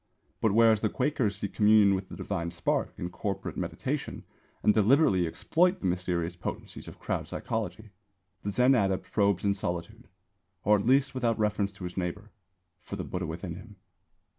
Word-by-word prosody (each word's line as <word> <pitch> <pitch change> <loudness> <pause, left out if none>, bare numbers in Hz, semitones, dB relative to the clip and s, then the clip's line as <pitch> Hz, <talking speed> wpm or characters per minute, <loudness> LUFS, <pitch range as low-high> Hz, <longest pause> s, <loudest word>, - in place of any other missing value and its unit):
But 110 - +3
whereas 110 -1 +5
the 110 - 0
Quakers 125 -6 0
seek 100 0 -5
communion 105 -2 +5
with 95 0 -3
the - - -8
Divine 85 0 -3
Spark 85 -1 -1
in 90 - -4
corporate 100 -1 -4
meditation - - -3 0.4
and 105 - +5
deliberately 105 - +4
exploit 180 - +1
the - - -6
mysterious 90 -1 -1
potencies 85 - -6
of - - -10
crowd - - -3
psychology 110 -1 -4 0.5
the 105 - -3
Zen 125 +6 +4
adept 95 -6 0
probes 100 -3 +2
in 100 - +3
solitude 90 -4 -5 0.6
(or 105 0 +4
at 100 - -3
least 135 +1 +4
without 120 -3 0
reference 105 -2 0
to 95 - -10
his 90 +1 -6
neighbour) 95 +4 -4 0.5
for - - -7
the - - -4
Buddha 90 -1 -4
within 85 +2 -5
him. 105 +2 -12
100 Hz, 170 wpm, -29 LUFS, 90-110 Hz, 0.6 s, whereas